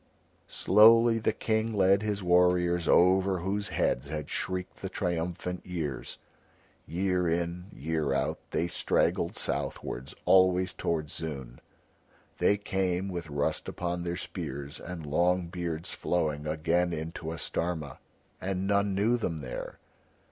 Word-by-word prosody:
Slowly 115 +3 +6
the 110 - +1
King 110 +1 -1
led 95 0 +5
back 105 - -4
his 100 -2 -1
warriors 90 -1 +3
over 95 +1 +4
whose 100 +3 -2
heads 65 +3 0
had 75 -1 -5
shrieked 90 0 -3
the 95 - -5
triumphant 90 0 -3
years. 80 -8 -4 0.7
Year 90 0 0
in, 85 +2 -2
year 75 +2 -2
out, 70 - 0
they 85 - 0
straggled 85 - 0
southwards, 65 +2 -3
always 95 -1 +4
towards 80 -2 -2
Zoon; 70 -6 -6 0.8
they 105 - +4
came, 95 -2 -1
with 85 -4 -5
rust 70 0 -1
upon 90 0 -3
their 85 0 -3
spears 70 +2 -6
and 85 -3 -7
long 85 +4 +1
beards 85 -2 -4
flowing, 75 -4 -1
again 85 +3 +1
into 80 0 -5
Astarma, 80 -3 -3 0.4
and 95 0 -2
none 100 0 +2
knew 110 +5 +3
them 85 -8 -2
there. 65 -5 -6
90 Hz, 130 wpm, -29 LUFS, 80-95 Hz, 0.8 s, Slowly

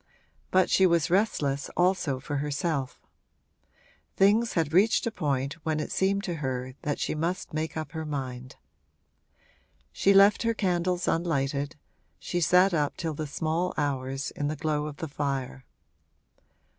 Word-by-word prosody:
But 185 0 +3
she 190 - +5
was 170 -1 +1
restless 150 -8 +1
also 175 -7 +1
for 145 +2 -4
herself: 145 -1 -2 1.2
things 210 +4 +3
had 160 -3 0
reached 200 +6 +4
a 230 - -1
point 140 -3 -2
when 155 -1 -1
it 150 - -4
seemed 195 +1 +1
to 175 -4 -3
her 130 -3 -3
that 145 -1 -2
she - - -2
must 165 +3 -3
make 155 +1 -3
up 155 - -4
her 160 -1 -4
mind. 130 -4 -5 1.4
She 195 - +2
left 200 +1 +6
her 230 0 +1
candles 180 -3 0
unlighted 145 -3 0 0.4
she 175 - -3
sat 180 +4 +4
up 150 -3 0
till 165 -2 -3
the 150 +1 -4
small 160 +4 -1
hours, 135 -2 -2
in 145 - -3
the 155 - -2
glow 150 0 -1
of 145 -1 -8
the 160 - -4
fire. 135 -3 -3
155 Hz, 150 wpm, -27 LUFS, 140-180 Hz, 1.4 s, left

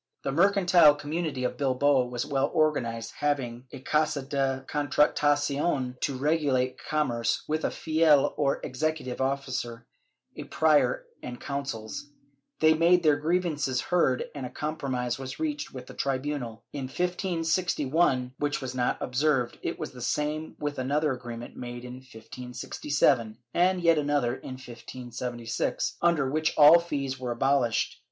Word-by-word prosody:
The 135 - -1
mercantile 175 -2 +5
community 145 -2 -3
of 125 - -2
Bilbao 135 -1 +2
was 125 +1 -3
well 140 0 0
organized, 115 -7 0
having 130 -4 -1
a - - -8
Casa 150 0 +1
de 135 -1 -1
Contratacion 145 -1 +1
to 135 -3 -1
regulate 140 -3 +1
com 150 -2 0
merce, 115 -1 -1
with 155 +1 -1
a - - +2
Fiel 155 -3 +3
or 140 -2 +1
executive 145 -2 -2
officer, 130 -3 -2 0.5
a - - -7
Prior 160 - +2 0.2
and 120 -1 -7
Consuls. 140 0 -5 0.5
They 155 0 +6
made 170 +2 +4
their 150 -2 +4
grievances 150 -5 0
heard 135 -7 +1
and 140 - -6
a 125 - -4
compromise 135 -5 -3
was 130 -1 -7
reached 300 -2 -3
with 130 -1 -8
the - - -11
tribunal, 135 -4 -3
in 140 -2 -4
1561, 165 -5 0
which 145 0 0
was 130 -2 -5
not 125 -1 0
observed; 130 -1 0
it - - -3
was - - -5
the 125 - -11
same 150 +5 -2
with 145 -1 -3
another 145 +3 +1
agreement 120 -2 -7
made 120 0 -7
in 125 0 -8
1567 125 0 -1 0.2
and 180 +1 +2
yet 165 -2 +5
another 145 -4 +1
in 130 - -7
1576, 125 -1 -4
under 170 -5 +3
which 155 +3 0
all 155 +3 +9
fees 140 -6 -3
were 125 -1 -4
abolished. 135 -2 +1
140 Hz, 145 wpm, -27 LUFS, 125-155 Hz, 0.5 s, all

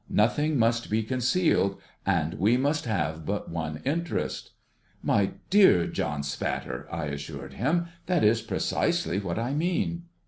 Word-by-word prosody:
Nothing 145 +8 +2
must 115 0 +2
be 110 +1 +1
concealed, 125 - +1 0.3
and 85 -5 +1
we 110 +7 +4
must 145 +3 0
have 80 -8 -1
but 100 +3 -3
one 80 -2 -4
interest.' 165 +5 -2 0.3
' - - -36
My 100 -1 +2 0.2
dear 190 - +6
John 75 -1 -2
Spatter,' 65 -3 -3
I 85 -1 -2
assured 70 0 -6
him, 170 +8 +1
' 170 - -31
that 180 -3 +2
is 110 +2 +4
precisely 95 - 0
what 90 -4 -3
I 120 +4 -1
mean.' 170 +2 -1
110 Hz, 150 wpm, -27 LUFS, -, 0.3 s, dear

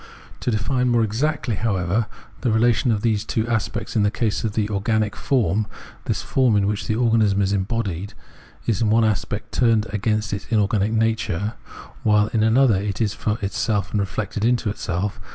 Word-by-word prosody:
To - - -2
define 125 +3 +1
more 120 -1 +3
exactly, 125 +3 -1
however, 100 0 0 0.3
the 125 - +1
relation 115 +2 +3
of 105 -2 -1
these 110 -3 +1
two 110 0 -1
aspects 115 0 -2
in 110 - +3
the 105 - +3
case 110 0 -1
of 110 -2 -1
the 105 -1 0
organic 105 +1 0
form, 110 -5 +1 0.4
this - - -1
form, 130 -5 +2
in 100 -1 +3
which 105 0 -2
the 110 - 0
organism 110 -4 +3
is 95 +1 0
embodied, 100 -2 -2 0.5
is 115 -1 0
in 110 - +2
one 110 +1 +4
aspect 105 0 -2
turned 115 -3 +2
against 105 +1 -1 0.2
inorganic 105 -1 +2
nature, 110 -3 0 0.5
while 105 -1 +3
in 110 - +2
an 110 +2 +3
other 120 -8 +4
it 100 -1 -3
is 110 -3 +1
for 105 0 -2
itself 100 -2 -1
and 105 - 0
reflected 105 +1 -3
into 120 -2 +2
itself. 95 0 -3
110 Hz, 180 wpm, -22 LUFS, 100-115 Hz, 0.5 s, one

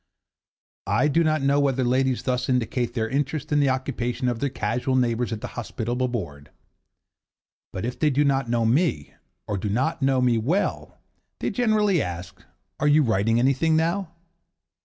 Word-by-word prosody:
I 150 - +2
do 165 +4 +3
not 155 -2 +1
know 140 +1 +3
whether 135 -2 +1
ladies 130 +1 +1
thus 125 0 -1
indicate 125 -1 -1
their 110 -2 0
interest 140 +4 -2
in 145 - +3
the 140 -2 +3
occupations 125 -1 -1
of 115 - -5
their 140 - 0
casual 125 +2 -1
neighbours 120 -2 +1
at 110 -1 -4
the - - -5
hospitable 120 +3 -3
board. 85 - -6 1.2
But 95 - -4
if 125 - -5
they 155 - +3
do 145 +1 +2
not 135 -3 +1
know 115 -1 +1
me, 125 - +1 0.3
or 105 -2 -3
do 105 - -3
not 130 +10 -1
know 135 -1 +2
me 120 -2 +2
well, 165 - -1 0.4
they - - -2
generally 215 - +2
ask 90 +1 -6 0.4
'Are 150 - +1
you 150 +1 +5
writing 115 -1 +1
anything 135 +6 +2
now? 170 +3 0
130 Hz, 170 wpm, -24 LUFS, 115-145 Hz, 1.2 s, you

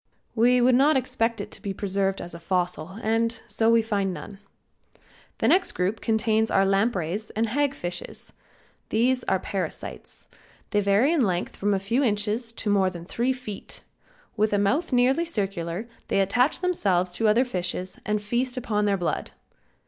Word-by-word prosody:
We 245 +2 +4
would 250 +1 +5
not 275 +4 +5
expect 235 -3 -1
it - - -8
to - - -8
be 200 -3 -4
preserved 195 -1 -1
as 175 - -6
a 170 - -8
fossil 180 0 -2
and 225 +1 0
so 225 0 +1
we 230 0 +5
find 200 -3 0
none. 195 +2 -8 1.0
The - - +1
next 370 - +3
group 190 +5 -1
contains 220 0 +1
our 195 - +3
lampreys 195 -1 0
and 225 +1 +1
hag 280 +3 +1
fishes. 175 -4 -6 0.6
These 250 +3 +2
are - - +2
parasites. 190 0 -6 0.4
They 205 - +2
vary 205 +10 +3
in 325 - +2
length 180 -6 -1
from 205 0 +1
a - - 0
few 230 +8 0
inches 215 +1 0
to 230 - -6
more 195 -2 +3
than 170 -2 -9
three 240 +7 0
feet. 250 -6 -7 0.5
With 215 -1 +1
a - - +3
mouth 275 - +1
nearly 255 +6 +3
circular 195 - -3 0.2
they - - +1
attach 245 - +2
themselves 195 - +1
to 220 +5 0
other 230 +5 +4
fishes 185 -4 -3
and 210 +1 0
feast 245 +5 -2
upon 210 -4 0
their 200 -1 +2
blood. 175 -2 -2
210 Hz, 170 wpm, -25 LUFS, 195-245 Hz, 1.0 s, would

